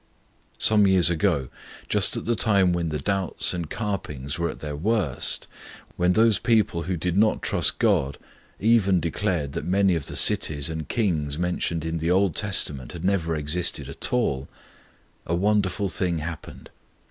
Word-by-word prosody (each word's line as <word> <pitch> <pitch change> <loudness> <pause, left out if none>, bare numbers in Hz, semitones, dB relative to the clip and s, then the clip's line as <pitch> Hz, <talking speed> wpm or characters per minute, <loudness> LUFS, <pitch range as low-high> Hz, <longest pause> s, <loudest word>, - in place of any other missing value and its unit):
Some 105 -2 +4
years 90 -2 +4
ago, 80 -7 0 0.4
just - - +1
at - - -5
the 120 - +1
time 100 -5 +3
when 85 -1 -1
the 75 - -2
doubts 95 +1 0
and 85 -3 -4
carpings 80 - -4
were 85 - 0
at - - -8
their 75 -1 -5
worst, 95 - -1 0.5
when 90 +1 +2
those 110 0 +3
people 110 -7 +1
who 90 +2 -3
did 90 +2 -2
not 110 +2 +2
trust - - +1
God 70 +1 +1 0.4
even 100 -4 +3
declared 85 -3 -2
that - - -4
many 95 +1 +2
of 80 -4 -3
the - - -7
cities 70 0 +3
and 80 -2 -6
kings 80 -10 -1
mentioned 85 -2 -2
in 80 0 -2
the 80 +1 -1
Old 95 -1 +2
Testament 75 - -1
had 85 +1 -6
never 85 -4 0
existed 75 -1 -2
at 70 - 0
all, 70 - 0 0.8
a 85 - 0
wonderful 100 0 +1
thing 90 -2 -2
happened. 80 0 -8
90 Hz, 165 wpm, -24 LUFS, 80-100 Hz, 0.8 s, Some